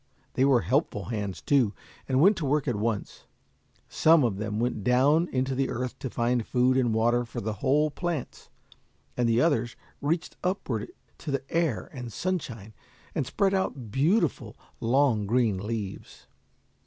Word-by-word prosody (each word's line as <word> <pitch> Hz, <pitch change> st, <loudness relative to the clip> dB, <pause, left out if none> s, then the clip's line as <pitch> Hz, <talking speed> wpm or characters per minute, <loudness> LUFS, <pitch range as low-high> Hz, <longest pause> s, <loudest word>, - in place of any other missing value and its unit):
They 130 Hz, -, +2 dB
were 135 Hz, -4 st, +4 dB
helpful 115 Hz, -, -1 dB
hands, 100 Hz, -3 st, -4 dB
too, 130 Hz, -8 st, +2 dB, 0.3 s
and 130 Hz, 0 st, +2 dB
went 195 Hz, +8 st, +6 dB
to 160 Hz, -, -2 dB
work 145 Hz, +1 st, +1 dB
at 120 Hz, -, 0 dB
once. 105 Hz, 0 st, -3 dB, 0.6 s
Some 160 Hz, -2 st, +4 dB
of 110 Hz, -6 st, 0 dB
them 105 Hz, 0 st, -3 dB
went 120 Hz, -3 st, -1 dB
down 140 Hz, -, +3 dB
into 130 Hz, +1 st, 0 dB
the 135 Hz, +1 st, 0 dB
earth 125 Hz, +2 st, -4 dB
to 130 Hz, -, -4 dB
find 120 Hz, 0 st, 0 dB
food 125 Hz, +3 st, +2 dB
and 125 Hz, -3 st, +2 dB
water 120 Hz, +2 st, +2 dB
for 120 Hz, -, -6 dB
the 110 Hz, +1 st, -3 dB
whole 150 Hz, +3 st, +2 dB
plants, 170 Hz, -3 st, -4 dB, 0.7 s
and 120 Hz, -1 st, +1 dB
the 115 Hz, +1 st, +3 dB
others 125 Hz, -8 st, +1 dB, 0.3 s
reached 160 Hz, +4 st, -2 dB
upward 160 Hz, -, -2 dB, 0.3 s
to 160 Hz, -, -7 dB
the 135 Hz, -1 st, -1 dB
air 165 Hz, -8 st, 0 dB
and 125 Hz, -4 st, -7 dB
sunshine, 120 Hz, -, -4 dB, 0.4 s
and 125 Hz, -, -1 dB
spread 195 Hz, -1 st, +1 dB
out 135 Hz, -, -2 dB
beautiful, 165 Hz, -, +1 dB, 0.2 s
long 120 Hz, -3 st, +2 dB
green 115 Hz, -4 st, +2 dB
leaves. 105 Hz, -1 st, -6 dB
125 Hz, 160 wpm, -27 LUFS, 115-145 Hz, 0.7 s, went